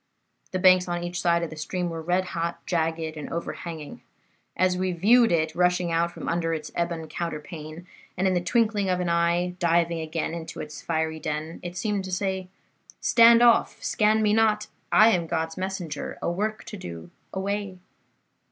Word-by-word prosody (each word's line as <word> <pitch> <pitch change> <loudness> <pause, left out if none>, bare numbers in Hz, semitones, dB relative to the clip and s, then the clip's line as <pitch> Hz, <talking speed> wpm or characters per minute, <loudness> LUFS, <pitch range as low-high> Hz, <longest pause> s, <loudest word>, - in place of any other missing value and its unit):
The 185 - -1
banks 185 0 +5
on 175 0 -2
each 175 +1 -3
side 170 -1 +2
of 170 - -4
the - - -7
stream 175 +3 -3
were 165 -1 -4
red 180 +3 0
hot, 170 0 -3
jagged 160 -2 -1
and 150 - -7
overhanging. 165 -2 -6 0.6
As 185 0 +3
we 185 0 -1
viewed 225 +7 +5
it 160 -2 +1
rushing 180 0 +1
out 165 +1 +2
from - - -8
under 165 -1 0
its 155 -1 -7
ebon 170 -2 -2
counterpane, 155 0 -6 0.3
and 190 +2 +2
in 185 - +2
the 175 - +1
twinkling 210 0 +1
of 180 0 +1
an 180 -1 -1
eye 170 +1 +1
diving 170 0 +2
again 160 0 -3
into 165 -1 -7
its 150 -2 -7
fiery 160 -1 -1
den, 155 +1 -4
it 175 0 -7
seemed 205 0 -1
to 185 - -6
say, 190 0 -2 0.5
'Stand 235 0 +6
off! 235 -1 +4
Scan 215 0 +2
me 210 -1 +3
not! 215 -1 +3 0.3
I 215 +1 +7
am 175 -6 +1
God's 160 0 -2
messenger. 185 -6 -4
A - - -1
work 215 +4 -2
to 210 - -8
do. 85 - -8 0.2
Away! 200 0 -3
175 Hz, 180 wpm, -26 LUFS, 165-190 Hz, 0.6 s, I